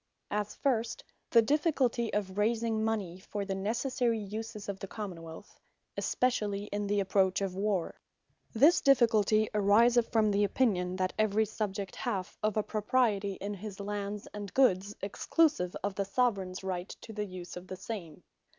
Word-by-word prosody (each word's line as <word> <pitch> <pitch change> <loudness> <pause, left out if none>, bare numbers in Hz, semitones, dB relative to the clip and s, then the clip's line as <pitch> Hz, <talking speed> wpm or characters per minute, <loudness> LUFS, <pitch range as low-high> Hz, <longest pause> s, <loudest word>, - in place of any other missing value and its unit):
As 210 0 -2
first, 235 -5 0 0.3
the 230 - +6
difficulty 265 -4 +1
of 195 -2 -2
raising 225 0 +1
Mony, 205 -5 -2
for 200 +1 -5
the 195 - -2
necessary 235 +4 0
uses 215 +1 -6
of 200 -1 -4
the 195 - -6
Common 190 -5 -6
wealth; 165 +4 -11 0.4
especially 210 -5 0
in 205 0 -1
the 205 0 +1
approach 190 -1 +2
of 195 -2 -2
warre. 195 -3 -1 0.5
This 295 +10 +5
difficulty 220 -5 +4
ariseth 225 +4 +4
from 215 -2 +3
the 205 +1 +2
opinion, 190 -4 +1
that 185 0 -1
every 215 0 +3
Subject 200 -2 -4
hath 185 -2 -3
of 215 0 0
a 215 - +2
Propriety 210 -3 +1
in 200 +2 -5
his 205 0 -8
lands 205 0 -4
and 205 -2 -6
goods, 205 -6 +3
exclusive 205 - +1
of 200 0 -1
the 200 - -1
Soveraigns 195 -4 0
Right 185 0 -3
to 220 - -9
the 210 0 -2
use 185 -2 -8
of 180 +1 -8
the 185 - -6
same. 185 -5 -7
205 Hz, 160 wpm, -31 LUFS, 195-225 Hz, 0.5 s, the